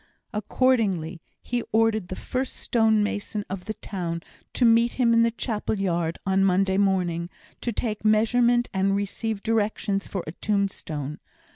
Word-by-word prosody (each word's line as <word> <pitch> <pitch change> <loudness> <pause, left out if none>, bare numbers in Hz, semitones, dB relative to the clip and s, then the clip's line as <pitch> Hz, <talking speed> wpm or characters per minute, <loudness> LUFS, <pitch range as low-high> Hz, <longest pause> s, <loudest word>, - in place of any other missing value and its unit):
Accordingly, 210 -8 +1 0.2
he 245 0 -1
ordered 220 -3 +2
the 185 - -5
first 255 +6 -3
stonemason 215 -2 +1
of 190 -2 -5
the 215 - -4
town 170 -4 -4 0.3
to 245 - +2
meet 230 +1 +4
him 240 -3 +3
in 230 - +5
the 230 - +4
chapel 220 -2 -2
yard 170 -4 -1
on 195 0 +2
Monday 190 0 +3
morning, 180 -4 +1 0.3
to 240 - -1
take 215 -1 -3
measurement 235 +3 +3
and 195 +1 +2
receive 205 +1 -3
directions 210 -2 0
for 190 -3 -4
a 155 - -5
tombstone. 165 -7 -2
205 Hz, 145 wpm, -25 LUFS, 190-225 Hz, 0.3 s, in